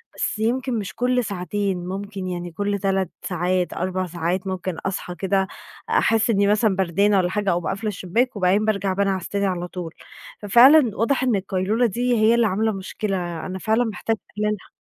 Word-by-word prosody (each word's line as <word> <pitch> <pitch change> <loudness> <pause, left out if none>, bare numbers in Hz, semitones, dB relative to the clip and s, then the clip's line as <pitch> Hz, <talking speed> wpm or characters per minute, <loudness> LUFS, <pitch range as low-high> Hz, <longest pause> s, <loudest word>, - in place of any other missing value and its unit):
بس - - -2
يمكن 240 +2 0
مش 190 -4 -6
كُلّ 250 +1 +1
ساعتين، 195 -2 -2
مُمكن 195 +1 -5
يعني 175 -1 -4
كُلّ 200 +4 -2
3 195 -2 0
ساعات 180 0 -1
4 185 +1 -2
ساعات 175 +2 -2
مُمكن 185 -2 -3
أصحى 185 -2 -3
كده 190 +2 0 0.4
أحس 225 0 +2
إني 200 -2 +3
مثلًا 210 -1 +3
بردانة 195 +2 +2
والّا 180 -2 +2
حاجة، 205 0 -1
أقوم 175 0 -1
قافلة 215 +2 -3
الشباك 210 +6 -1
وبعدين 200 +2 +2
بارجع 200 -3 0
بانعس 195 -2 0
تاني 200 0 0
على 180 -2 -2
طول، 175 -2 -7 0.5
ففعلًا 240 +3 +6
واضح 255 +4 +1
إن 250 -4 +2
القيلولة 195 +4 0
دي 245 +3 0
هي 220 +2 +4
اللي 235 -1 +3
عاملة 215 +3 +1
مشكلة، 190 -4 -4
أنا 190 0 -5
فعلًا 220 +4 +1
محتاجة 225 0 -2 0.2
أقللها. 210 -2 -2
200 Hz, 175 wpm, -22 LUFS, 185-220 Hz, 0.5 s, ففعلًا